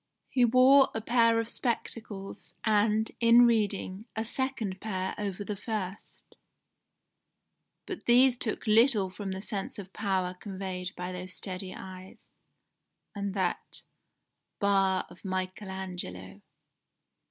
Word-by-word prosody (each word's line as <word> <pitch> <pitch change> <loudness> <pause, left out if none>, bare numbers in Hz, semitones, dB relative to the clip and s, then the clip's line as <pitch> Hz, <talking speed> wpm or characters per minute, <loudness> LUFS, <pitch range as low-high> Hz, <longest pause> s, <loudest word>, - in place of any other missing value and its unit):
He 250 -2 +4
wore 260 +3 +6
a - - 0
pair 230 0 +3
of 230 - -2
spectacles, 225 -5 -3
and, 215 0 +2
in 235 +1 +7
reading, 205 -3 0
a 220 +1 -2
second 235 -6 -2
pair 190 -3 -2
over 205 -1 -4
the 205 +1 -4
first: 200 -2 -6 1.5
but 375 - -7
these 250 +1 +6
took 235 -2 -3
little 215 -3 +4
from 195 0 -5
the 190 0 -4
sense 200 -1 -4
of 195 -2 -9
power 190 -3 -1
conveyed 185 -1 -5
by 180 +1 -4
those 185 0 -5
steady 185 -1 -4
eyes, 185 0 -11 0.8
and 200 -1 -3
that 185 -3 -1 0.8
'bar 195 -2 +2
of - - -16
Michael 185 +1 -3
Angelo. 100 - -6
200 Hz, 120 wpm, -29 LUFS, 185-225 Hz, 1.5 s, in